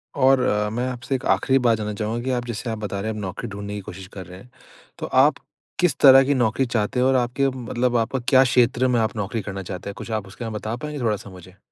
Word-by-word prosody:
और 135 -1 +4
अ, 105 -3 +1
मैं 120 +4 -2
आपसे 125 +2 -3
एक 130 - -5
आखिरी 135 -1 +2
बात 120 -3 +3
जानना 105 -1 -4
चाहूँगा 110 +3 -3
कि 130 - -1
आप 120 -1 -1
जैसे 120 0 -5
आप 110 - -3
बता 105 -2 -4
रहे 110 +3 -3
हैं, - - -5
आप - - -5
नौकरी 95 +4 -5
ढूँढने 100 0 -6
की 105 - -5
कोशिश 95 0 -10
कर 95 -2 -8
रहे 90 +2 -11
हैं, 125 - -16 0.5
तो - - -3
आप - - +4 0.4
किस 180 -2 +2
तरह 135 -1 +8
की 145 - +2
नौकरी 125 0 +1
चाहते 120 0 -1
हो? 125 - +3
और 135 - +3
आपके, 125 +2 +1
मतलब 125 -1 -2
आपका 115 +3 -1
क्या 130 -1 +6
क्षेत्र 125 0 +2
में 125 -2 +2
आप 110 0 -1
नौकरी 105 +1 -3
करना 95 -1 -6
चाहते 90 +1 -6
हैं? - - -6
कुछ 115 - -7
आप 105 -3 -2
उसके 105 +5 -8
में 110 - -5
बता 110 +1 -4
पाएँगे 150 +4 -6
थोड़ा-सा 105 -2 -2
मुझे? 95 0 -14
115 Hz, 265 wpm, -23 LUFS, 105-125 Hz, 0.5 s, तरह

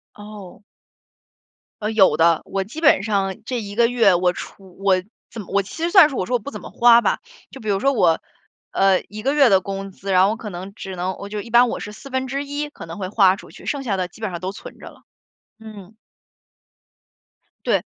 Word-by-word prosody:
哦。 205 -2 -11 1.2
呃， 210 +1 -1
有 190 -8 +4
的， 165 0 +4
我 195 -1 -2
基 275 - -9
本 285 - +5
上 195 -2 -1
这 250 -3 -3
1 205 -1 -8
个 235 +1 +4
月， 230 -7 +4
我 180 0 +2
除 190 0 -11
我 195 -2 +3 0.3
怎 225 - -8
么 185 - -12
我 200 - +2
其 195 - -11
实 340 - 0
算 360 -7 +8
是 270 - -7
我 185 - -1
说 250 +4 -1
我 - - +1
不 230 - -8
怎 - - -8
么 - - -11
花 235 0 +6
吧。 - - 0 0.3
就 270 - -11
比 215 - -9
如 195 -1 +1
说 275 +3 +2
我， 165 -9 +3 0.5
呃， 195 -1 +3
1 215 +1 -8
个 270 +4 0
月 280 -3 +6
的 190 -1 +4
工 195 +1 -6
资， 195 +1 -6
然 185 0 +5
后 200 - +3
我 - - -2
可 215 -2 -8
能 190 +2 -8
只 190 -3 -8
能 185 +1 -3
我 200 - -8
就 210 - -4
一 225 +2 -9
般 240 0 +5
我 - - -4
是 210 - -7
1/4 275 +4 -4
可 165 - -11
能 165 - -8
会 185 -2 -4
花 195 -3 +4
出 - - -14
去， - - -14
剩 280 -2 -2
下 210 -7 -1
的 185 -1 -2
基 220 - -18
本 210 -4 -3
上 175 - -5
都 185 +2 -4
存 - - -12
着 - - -11
了， - - -20 0.6
嗯。 215 -2 -12 1.7
对。 - - +2
205 Hz, 235 characters per minute, -21 LUFS, 190-240 Hz, 1.7 s, 算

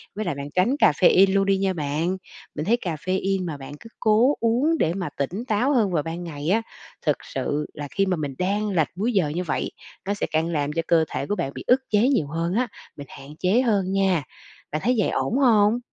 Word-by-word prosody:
Với 215 +1 -3
lại 175 - -2
bạn 140 +1 -6
tránh 190 +9 +3
caffeine 190 - +5
luôn 195 0 +3
đi 195 0 +2
nha 190 0 0
bạn, 160 +3 -1 0.4
mình 150 - -3
thấy 235 +5 +3
caffeine 185 +3 -1
mà 160 -4 -4
bạn 135 +1 -9
cứ - - -12
cố 230 +6 +4
uống 250 +8 +2
để 165 - +2
mà 180 -3 -3
tỉnh 180 - -3
táo 245 +6 +2
hơn 220 -7 +2
vào 160 -4 0
ban 165 +3 -5
ngày 150 -2 -5
á, 220 +5 +3 0.4
thực - - +2 0.2
sự 150 +1 -1
là 145 -1 -6
khi 195 - +1
mà 185 -2 0
mình 145 -3 -4
đang 205 +3 0
lệch 165 -6 +1
múi 220 +7 -1
giờ 180 -8 +2
như 170 +5 -2
vậy, 170 - -2 0.4
nó 200 - +1
sẽ 205 - -2
càng 160 +1 +1
làm 150 -3 -1
cho 165 - 0
cơ 165 -2 +4
thể - - -3
của 205 - 0
bạn 165 -8 -3
bị - - -6
ức 260 +2 +4
chế 215 +3 +3
nhiều 185 - +1
hơn 165 +4 -2
á, 250 +2 +1 0.3
mình 140 -1 -8
hạn 135 - -12
chế 195 +7 +3
hơn 200 -7 +1
nha. 190 -5 +2 0.5
Bạn 155 - -2
thấy 250 +1 +3
vậy 210 - +2
ổn 245 - -1
hông? 225 -4 +4
185 Hz, 235 wpm, -24 LUFS, 160-215 Hz, 0.5 s, caffeine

